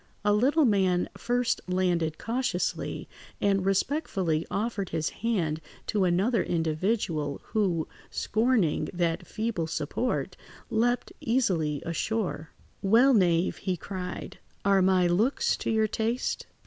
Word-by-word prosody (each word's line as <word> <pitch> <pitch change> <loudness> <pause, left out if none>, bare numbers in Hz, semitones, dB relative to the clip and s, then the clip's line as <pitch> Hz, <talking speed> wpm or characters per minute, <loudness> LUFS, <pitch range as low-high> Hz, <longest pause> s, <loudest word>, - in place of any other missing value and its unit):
A 205 - +4
little 275 +8 +4
man 190 -5 +2
first 245 0 0
landed 175 -4 0
cautiously, 230 -5 -2 0.3
and 195 -2 +2
respectfully 195 - 0
offered 200 0 -2
his 160 -1 -1
hand 175 -9 0 0.2
to 205 -4 +1
another 195 +7 +2
individual, 160 -2 -1
who, 185 -7 +1 0.2
scorning 215 -9 +1
that 170 -2 -1
feeble 215 -7 -2
support, 165 - -2 0.4
leapt 245 +2 +1
easily 180 - 0
ashore. 170 -1 -2 0.3
"Well, 230 +7 +5
knave," 175 -5 +3
he 185 -2 -2
cried, 180 0 -6 0.3
"are 195 -1 +5
my 185 -1 +4
looks 205 +10 +2
to - - -3
your 220 -1 +3
taste?" 225 +3 -2
195 Hz, 115 wpm, -28 LUFS, 170-225 Hz, 0.4 s, Well